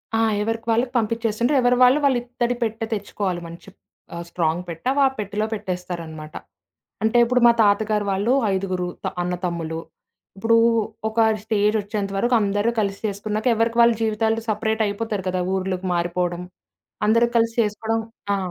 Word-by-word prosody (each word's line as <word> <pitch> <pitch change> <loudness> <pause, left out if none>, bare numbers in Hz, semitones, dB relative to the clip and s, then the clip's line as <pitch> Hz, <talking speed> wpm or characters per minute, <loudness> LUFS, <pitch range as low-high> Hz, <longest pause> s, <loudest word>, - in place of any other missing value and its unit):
ఆ! - - +2 0.2
ఎవరికి 225 +2 -3
వాళ్ళకి 245 +2 +1
పంపిచ్చేస్తుంటరు. 230 +4 0
ఎవరి 245 0 +3
వాళ్ళు 255 +4 +6
వాళ్ళ 275 -2 +4
ఇత్తడి 245 0 -2
పెట్ట 225 0 -3
తెచ్చుకోవాలి 200 -3 -3
మంచి 170 +3 -11 0.5
ఆహ్, 170 - -5
స్ట్రాంగ్ 170 0 0
పెట్ట 165 +3 -8
వ - - +3 0.2
పెట్టెలో 210 +1 -2
పెట్టేస్తారనమాట. 170 -6 -6 0.7
అంటే 220 +2 +2
ఇప్పుడు 250 +1 +1
మా - - +8
తాతగారు 210 0 +2
వాళ్ళు 205 +6 +1 0.2
ఐదుగురు 185 -2 -2 0.2
త - - +1
అన్న 180 0 -2
తమ్ములు. 165 -2 -3 0.6
ఇప్పుడు 225 +3 +3 0.5
ఒక 220 - -2 0.2
స్టేజొచ్చేంత 210 -1 0
వరకు 240 +4 +2
అందరూ 205 +3 +1
కలిసి 200 -2 -1
చేసుకున్నాక, 210 +2 -3
ఎవరికి 230 +1 0
వాళ్ళ 235 0 +6
జీవితాలు 220 +1 0
సెపరేటయిపోతారు 215 -1 -1
కదా! 185 0 -1
ఊర్లుకి 185 0 -2
మారిపోవడం. 175 0 -1 0.6
అందరూ 230 +2 +4
కలిసి 230 0 +1
చేసుకోవడం 220 +2 -2 0.3
ఆ! - - -1
210 Hz, 145 wpm, -22 LUFS, 185-225 Hz, 0.7 s, మా